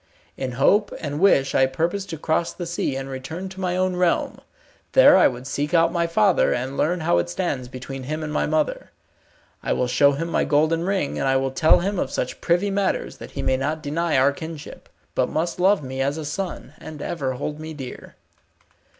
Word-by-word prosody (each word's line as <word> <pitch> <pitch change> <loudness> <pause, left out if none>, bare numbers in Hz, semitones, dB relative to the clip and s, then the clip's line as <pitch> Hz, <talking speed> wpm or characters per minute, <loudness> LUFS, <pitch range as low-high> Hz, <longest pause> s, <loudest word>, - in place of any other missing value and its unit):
In 130 -2 -4
hope 200 - +3
and 145 -2 -4
wish 140 -8 +4
I 130 - +4
purpose 170 +9 -2
to 165 - -5
cross 160 +2 0
the 175 - -6
sea, 170 -5 -2
and 135 0 -4
return 145 +8 -6
to 190 0 -11
my 180 -1 -1
own 185 0 +1
realm. 180 -1 0 0.5
There - - +8
I 185 - +6
would 125 0 -5
seek 145 +4 -2
out 165 0 +4
my 170 -1 0
father, 195 +1 +3
and 130 +3 -4
learn 175 +5 0
how 85 - +2
it 85 - -2
stands 125 +8 -2
between 130 +1 -7
him 155 +3 -3
and 150 -1 -4
my - - +1
mother. 155 0 -1 0.7
I - - 0
will - - 0
show 135 +3 +4
him 165 +4 -3
my 170 - +1
golden 155 +3 +2
ring, 190 -6 -1
and - - 0
I 135 - +3
will 135 0 +1
tell 155 +6 +4
him 195 +1 -1
of - - -1
such - - -3
privy 180 +4 +1
matters 195 -1 -1
that - - -9
he - - -2
may 130 - +2
not 150 +3 -2
deny 165 +1 0
our 135 +2 +4
kinship, 160 +1 -9 0.2
but - - +1
must 170 +3 -2
love 190 -2 +3
me 130 0 -4
as 140 +3 0
a 155 - -5
son, 160 -3 -5
and 155 -1 -9
ever 140 -6 -2
hold 150 +4 -5
me 155 0 -7
dear." 135 -3 -9
155 Hz, 215 wpm, -23 LUFS, 135-175 Hz, 0.7 s, There